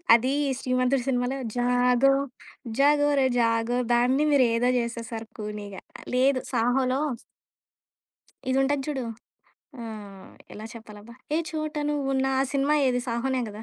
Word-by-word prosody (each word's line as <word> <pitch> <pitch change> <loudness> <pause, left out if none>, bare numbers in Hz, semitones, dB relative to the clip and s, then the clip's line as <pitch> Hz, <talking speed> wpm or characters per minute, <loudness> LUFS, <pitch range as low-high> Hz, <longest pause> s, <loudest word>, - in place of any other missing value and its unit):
అది 255 +4 +1 0.3
'శ్రీమంతుడు' 255 0 +1
సినిమాలో 250 +1 0 0.2
జాగో 250 +2 +3 0.7
జాగోర 290 0 +4 0.2
జాగో 230 +1 +1 0.2
దాన్ని 250 +4 +3
మీరు 270 -3 +5
ఏదో 245 +2 +2
జేసేసారు 230 -1 -4
కూనీగా 210 -2 -6 0.3
లేదు 260 +1 +3
'సాహోలో' 255 +3 +1 1.5
ఇదుంటది 270 +1 +1
చూడు. 270 -4 -2 0.8
ఆహ్, 205 -4 -9 0.2
ఎలా 215 - -8
చెప్పాలబ్బా? 220 0 -12 0.2
'ఏ - - +3
చోట 310 -1 -4 0.2
నువ్వున్న' 270 -2 0
ఆ - - +3
సినిమా 280 +2 +2
ఏది 250 -1 +1
'సాహోనే' 250 +2 -1
గదా! 210 +1 -9
250 Hz, 115 wpm, -26 LUFS, 230-270 Hz, 1.5 s, మీరు